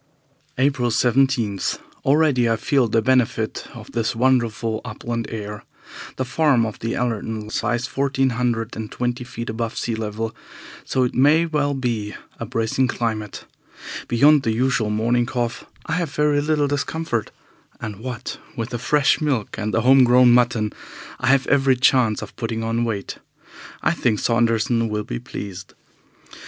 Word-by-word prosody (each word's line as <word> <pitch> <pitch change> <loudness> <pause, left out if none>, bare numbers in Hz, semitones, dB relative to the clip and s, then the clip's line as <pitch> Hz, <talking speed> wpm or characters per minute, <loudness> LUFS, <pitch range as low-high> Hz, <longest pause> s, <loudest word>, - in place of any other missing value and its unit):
April 130 -2 +2
17. 120 -3 +2 0.5
Already 140 -4 +3
I 115 - +3
feel 125 +3 +1
the 110 0 +1
benefit 125 -3 +1
of - - -10
this 115 -1 -1
wonderful 115 -3 +1
upland 115 -1 -4
air. 105 -2 -6 0.5
The 130 - -2
farm 135 -3 +2
of 110 - -6
the 115 +1 -2
Allertons 110 -2 -2
lies 120 +2 0
fourteen 135 0 0
hundred 115 -1 -1
and 110 -1 -6
twenty 120 +1 -2
feet 120 -1 -7
above 115 +1 -3
sea 120 - -2
level, 110 0 -4 0.5
so 130 - +1
it 125 - -1
may 150 +6 +4
well 145 -3 0
be 115 -5 -2 0.2
a - - -4
bracing 115 +3 0
climate. 110 -4 -3 0.6
Beyond 145 +5 +5
the 115 -3 0
usual 125 -2 +1
morning 120 +3 +1
cough 120 -2 -3 0.2
I - - -6
have 170 -2 0
very 145 0 +1
little 150 -1 +1
discomfort, 145 -4 -2 0.5
and, 110 -3 -6
what 120 +3 -6 0.2
with 115 +1 -3
the 120 - -3
fresh 145 +4 +2
milk 135 -8 -1
and 110 0 -2
the 115 - +1
home 130 +2 +6
grown 125 0 +6
mutton, 120 -3 +2 0.5
I 130 - -2
have 135 0 +4
every 135 -2 +3
chance 125 -3 +3
of - - -10
putting 115 -2 -3
on 115 +1 0
weight. 105 -4 -4 0.6
I - - +3
think 120 -10 +1
Saunderson 115 0 +1
will 105 0 -2
be - - -5
pleased. 95 -2 -8
120 Hz, 155 wpm, -22 LUFS, 110-130 Hz, 0.6 s, home